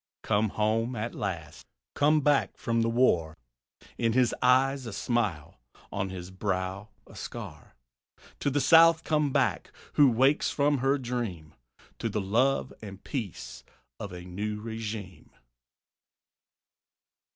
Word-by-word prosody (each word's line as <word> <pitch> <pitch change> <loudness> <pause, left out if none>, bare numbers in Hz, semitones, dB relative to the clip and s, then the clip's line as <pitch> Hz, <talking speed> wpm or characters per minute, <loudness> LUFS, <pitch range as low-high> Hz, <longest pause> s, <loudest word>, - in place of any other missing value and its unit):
Come 105 +1 +1
home 110 +4 0
at 115 +2 -4
last; 85 -6 -5 0.3
come 150 +1 +3
back 145 0 +2
from 115 -1 0
the 115 - +1
war; 90 -10 +2 0.6
In 115 -1 +1
his 125 -1 +3
eyes 130 +1 +3
a 110 - -6
smile, 100 - -2 0.3
on 95 -1 -2
his 90 -1 -7
brow 95 +1 -3 0.2
a - - -16
scar; - - -8 0.6
To - - 0
the 145 +1 0
South 165 +2 +6
come 150 -2 +1
back - - 0 0.2
who 145 -2 +6
wakes 130 +5 +3
from 145 -1 +1
her 135 +2 +2
dream 115 - -4 0.5
To - - -2
the 105 - -2
love 120 +8 +1
and 100 -3 -10
peace 115 - -6 0.4
of 100 - -6
a 90 -1 -8
new 105 +4 -4
regime. 110 -4 -6
115 Hz, 130 wpm, -28 LUFS, 95-135 Hz, 0.6 s, South